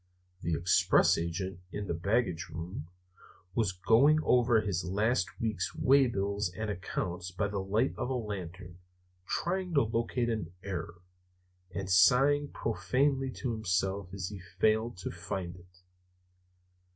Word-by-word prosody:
The 85 -1 0
express 90 +3 +4
agent, 85 +2 -3
in 105 0 -4
the 90 - -2
baggage 90 -1 0
room, 85 -1 -6 0.7
was 110 -3 +1
going 115 +12 +4
over 120 -2 +4
his 100 -4 -2
last 95 -2 0
week's 110 -6 -2
waybills 105 -7 +2
and 110 -1 -2
accounts 90 -1 -4
by 100 +3 -1
the 100 -1 -3
light 105 +7 +1
of - - -2
a 130 - 0
lantern, 90 -5 -6 0.5
trying 180 -1 -1
to 140 - +5
locate 115 +2 -1
an 105 -7 -3
error, 85 -2 -5 0.7
and 95 +1 -5
sighing 135 +10 +5
profanely 130 +7 0
to 130 -1 -3
himself 95 -3 -1
as 95 -1 -4
he 100 -2 -8
failed 110 +5 0
to 90 - -5
find 90 -2 -5
it. 90 0 -19
100 Hz, 135 wpm, -31 LUFS, 90-115 Hz, 0.7 s, to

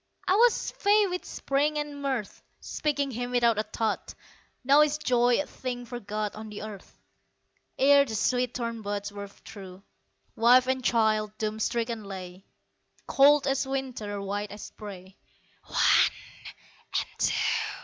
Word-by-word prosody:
I - - +4
was 465 +4 +3
fey 415 +1 +4
with 360 -2 -4
spring 290 +2 -1
and 295 -1 -4
mirth 260 -7 -3 0.2
Speaking 285 -2 -2
him 245 +1 -4
without 235 -3 +2
a - - +3
thought 215 0 -3 0.5
Now 280 +3 +6
is 300 0 +2
joy 245 -4 +2
a 290 - -1
thing 245 -3 -6
forgot 215 -3 -4
On 215 0 -8
the 210 0 -7
earth. 210 -3 -10 0.8
Ere 280 +1 +6
the 225 -5 -5
sweet 250 +3 0
thorn 230 -2 -3
buds 205 0 -4
were 200 0 -7
through, 195 -1 -12 0.5
Wife 245 +3 +5
and 260 0 -1
child 215 -3 +1
doom 215 0 -3
stricken 230 0 -2
lay, 185 -1 -8 0.6
Cold 285 +1 +5
as 270 0 0
winter, 255 -7 -4
white 200 +1 -3
as 205 0 -9
spray 190 -3 -10 0.5
"One - - +4 0.9
and - - -1
two!" - - +2
235 Hz, 145 wpm, -27 LUFS, 210-275 Hz, 0.9 s, Now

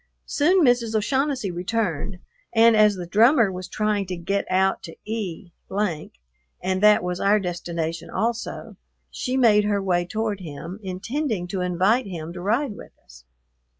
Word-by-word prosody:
Soon 340 +3 +3
Mrs. 240 -3 +2
O'Shaughnessy 265 -1 0
returned, 185 0 -2 0.4
and 225 0 +6
as 210 -1 +5
the 180 -2 -6
drummer 225 - +4
was 185 -1 -6
trying 210 -1 -1
to 180 -1 -4
get 195 +4 -2
out 190 +1 +2
to 165 - -9
E, 205 -4 -5 1.1
and 185 +1 -1
that 210 -2 +6
was 180 0 -3
our 205 +2 +3
destination 170 -2 -4
also, 230 +4 -3 0.3
she 255 +1 -2
made 210 -5 +5
her 205 -1 +1
way 180 -3 +1
toward 215 +2 -3
him, 170 +3 -8
intending 205 - -3
to 185 0 -2
invite 190 +7 +2
him 170 -3 -6
to 175 - -7
ride 225 +5 0
with - - -12
us. - - -17
200 Hz, 150 wpm, -24 LUFS, 180-225 Hz, 1.1 s, and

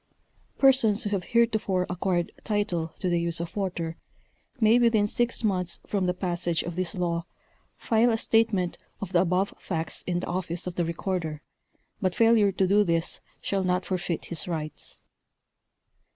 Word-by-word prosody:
Persons 255 -6 +4
who 205 - -3
have 195 -3 -1
heretofore 220 -6 +2
acquired 180 -1 -1
title 205 -6 0
to 185 - -2
the 175 -1 +1
use 170 -1 -2
of 170 0 -5
water, 175 -5 -3 0.6
may 225 +1 +5
within 230 -3 +4
six 235 +3 +1
months 180 -5 0
from 195 -3 0
the 180 - +2
passage 175 -2 -1
of 170 0 -5
this 180 -2 -2
law 170 -2 -1 0.5
file 230 +1 +3
a 225 - +1
state 225 0 +3
ment 180 -4 -1 0.2
of 195 -1 -6
the 170 - +5
above 185 +2 +1
facts 165 -3 -3
in 175 -1 0
the - - -4
office 175 -1 -3
of 180 - -4
the 175 -1 0
recorder, 165 -2 -3 0.6
but 185 -2 0
failure 225 -3 +5
to 190 0 +1
do 205 +3 +4
this 165 -3 -1 0.2
shall 195 -1 0
not 180 0 0
forfeit 180 -3 -2
his 170 0 -1
rights. 155 -3 -5
185 Hz, 165 wpm, -27 LUFS, 170-205 Hz, 0.6 s, may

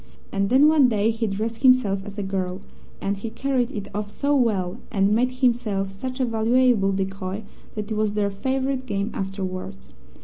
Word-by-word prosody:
And 195 0 0
then 270 +5 +6
one 305 -4 +6
day 220 -1 +2
he 225 0 -2
dressed 220 +3 -3
himself 255 -7 +4
as 205 0 -9
a 205 - -2
girl, 190 -1 -3 0.4
and 200 +1 -1
he 220 +3 -5
carried 255 0 0
it 205 -6 -5
off 205 0 -3
so 285 +7 0
well, 210 -6 +1
and 195 -2 +2
made 245 +3 +3
himself 235 -6 0
such 255 +7 -6
a 260 - +2
valuable 230 -2 +3
decoy, 195 +1 -3 0.3
that 210 0 -5
it - - 0
was 210 -1 0
their 205 -1 +1
favourite 260 +5 -2
game 200 0 -1
afterwards. 190 0 -5
210 Hz, 180 wpm, -24 LUFS, 195-250 Hz, 0.4 s, then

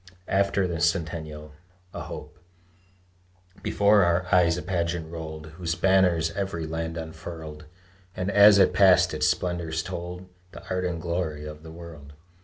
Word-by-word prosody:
AFTER 100 0 +2
THE 85 -2 -3
CENTENNIAL 80 -3 -2 0.4
(A - - -6
HOPE) - - -9 1.2
Before 100 0 +4
our 85 +1 +2
eyes 85 -2 +4
a - - -5
pageant 85 -3 -2
rolled 80 -2 -7
Whose 85 -2 -1
banners 90 -2 +3
every 95 -3 -3
land 80 +1 -4
unfurled; 80 -1 -8 0.5
And 90 +2 -2
as 100 0 +8
it 95 -2 +4
passed, 95 0 +5
its - - +1
splendors 85 -3 -1
told 90 0 -6 0.3
The - - -12
art 90 0 -1
and 85 -2 -2
glory 80 -3 -3
of 75 0 -8
the 80 - -11
world. 80 -3 -11
85 Hz, 145 wpm, -26 LUFS, 80-90 Hz, 1.2 s, as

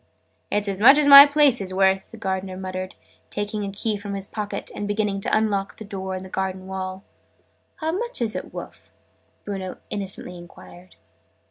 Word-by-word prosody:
"It's 205 0 0
as 195 0 -3
much 270 +6 +8
as 300 -1 +3
my 280 0 +12
place 285 -5 +3
is 185 -1 -3
worth!" 190 0 +2
the 230 - -12
Gardener 190 -3 -3
muttered, 185 0 -6 0.3
taking 205 0 -3
a 200 - -4
key 210 +1 -2
from 200 0 -6
his 195 0 -4
pocket, 210 -1 -5
and 205 - -4
beginning 205 -1 -1
to - - +1
unlock 200 -3 -1
a - - -7
door 190 -2 -5
in 185 - -6
the - - -9
garden 190 0 -4
wall. 190 0 -6 0.7
"How 315 0 -2
much 470 +8 -3
are 240 - +1
it - - -12
wurf?" - - -10 0.6
Bruno 190 -2 -5
innocently 190 -3 -5
enquired. 90 - -15
195 Hz, 185 wpm, -23 LUFS, 190-215 Hz, 0.7 s, my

